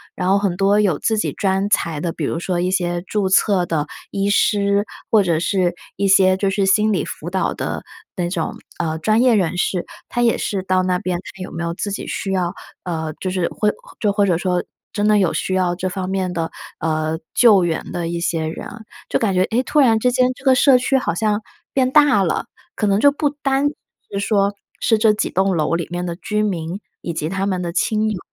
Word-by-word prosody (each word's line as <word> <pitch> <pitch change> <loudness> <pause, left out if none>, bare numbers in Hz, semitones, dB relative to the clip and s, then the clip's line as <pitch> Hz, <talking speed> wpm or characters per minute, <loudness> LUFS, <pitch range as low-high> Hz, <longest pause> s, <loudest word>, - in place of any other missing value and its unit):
然 180 - -2
后 195 +1 +4
很 195 -3 -1
多 200 +2 +3
有 195 -8 +2
自 220 - 0
己 - - 0
专 195 0 0
才 165 -7 0
的， 170 - -1
比 160 - -4
如 165 - -2
说 175 0 -2
一 180 +1 0
些 175 -2 -1
注 195 0 -1
册 190 -2 +3
的 155 -3 0 0.2
医 200 0 0
师， 200 0 +2 0.3
或 220 - +6
者 170 -4 +1
是 175 0 0 0.2
一 200 +1 0
些 190 -1 +5
就 195 0 +1
是 195 0 +1
心 210 +3 +3
理 185 -7 0
辅 165 - -6
导 190 +1 0
的 - - -4 0.3
那 175 -2 -1
种， 175 -3 -2 0.2
呃， 160 -2 -1
专 215 +8 +2
业 250 -2 +5
人 180 -3 0
士， 180 0 0 0.2
他 240 - -1
也 235 - +3
是 195 -2 -2
到 185 0 +2
那 185 -1 +1
边 180 -3 -2 0.2
看 190 - -7
有 - - -8
没 170 - -4
有 170 0 -2
自 205 - -3
己 195 - -4
需 195 - -3
要， 180 -2 0 0.3
呃， 160 -3 -3
就 185 - -2
是 180 -2 0
会 210 - 0 0.3
就 210 -3 +2
或 205 0 +3
者 175 -3 +2
说 180 0 0 0.3
真 205 0 +1
的 215 0 +5
有 185 -5 +2
需 185 - -2
要 180 -2 +1
这 185 +1 -2
方 185 0 -4
面 190 -1 -1
的， 165 -2 -3 0.3
呃， 155 0 -1 0.2
救 210 -6 +6
援 165 -2 -2
的 175 -1 -3
一 170 0 -3
些 165 -2 -1
人。 160 - -6 0.4
就 - - +2
感 210 -4 +1
觉， 180 - +2
诶， 235 +5 0
突 300 - +1
然 235 -6 +5
之 250 +2 +2
间 255 0 +3
这 275 - -17
个 265 - +6
社 260 0 +6
区 250 +2 +1
好 255 - -1
像 210 +2 0 0.3
变 260 -1 +2
大 290 -7 +5
了， 175 - -1 0.3
可 215 - -1
能 200 +1 +2
就 285 +4 +6
不 290 +1 0
单 280 -1 0 0.4
是 200 - -2
说 200 0 +1 0.3
是 225 - +3
这 220 -1 +5
几 210 - -1
栋 190 0 +1
楼 155 +1 0
里 170 -1 -2
面 175 +1 -3
的 170 -1 -3
居 210 +4 -2
民 175 -2 -2 0.2
以 170 - -4
及 155 -1 -2
他 190 +3 -2
们 185 -2 -1
的 170 -1 -4
亲 215 +3 +1
友， 195 - -4
190 Hz, 250 characters per minute, -20 LUFS, 175-210 Hz, 0.4 s, 或